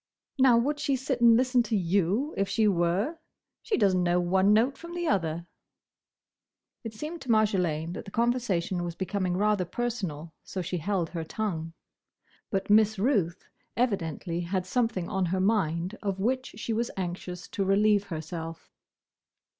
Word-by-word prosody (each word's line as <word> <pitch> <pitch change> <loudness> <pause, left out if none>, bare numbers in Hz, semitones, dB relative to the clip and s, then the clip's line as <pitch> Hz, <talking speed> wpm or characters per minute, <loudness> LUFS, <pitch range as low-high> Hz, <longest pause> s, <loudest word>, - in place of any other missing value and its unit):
"Now, 255 -3 +6
would 290 +5 0
she 280 -2 +1
sit 265 -1 -2
and 230 -1 +7
listen 255 0 +3
to 220 -2 0
you 195 - +1
if 195 -1 0
she 215 +1 +2
were? 195 - +1 0.4
She 440 - -1
does 200 -5 +3
n't 185 - +2
know 175 0 +2
one 190 +3 +3
note 235 +6 +3
from 340 +1 -8
another." 170 - 0 1.4
It 225 -2 -7
seemed 310 +8 -6
to 265 - -10
Marjolaine 180 -7 +1
that - - -7
the - - -8
conversation 210 -7 0
was 170 -1 -4
becoming 185 -1 -1
rather 210 -1 +2
personal, 180 -7 -4
so 190 - -6
she 175 +1 -3
held 175 -1 -1
her 165 -2 -3
tongue. 165 -3 -3 0.8
But 195 -1 -1
Miss 215 0 +4
Ruth 195 - 0 0.3
evidently 175 - -1
had 180 +1 -2
something 225 -4 0
on 190 -1 0
her 185 +2 0
mind 185 -2 +1
of 195 -2 -2
which 255 +5 -1
she 225 +1 -3
was 235 +2 -1
anxious 180 0 -5
to 200 - -1
relieve 205 +1 +3
herself. 165 -1 -6
195 Hz, 160 wpm, -28 LUFS, 175-235 Hz, 1.4 s, and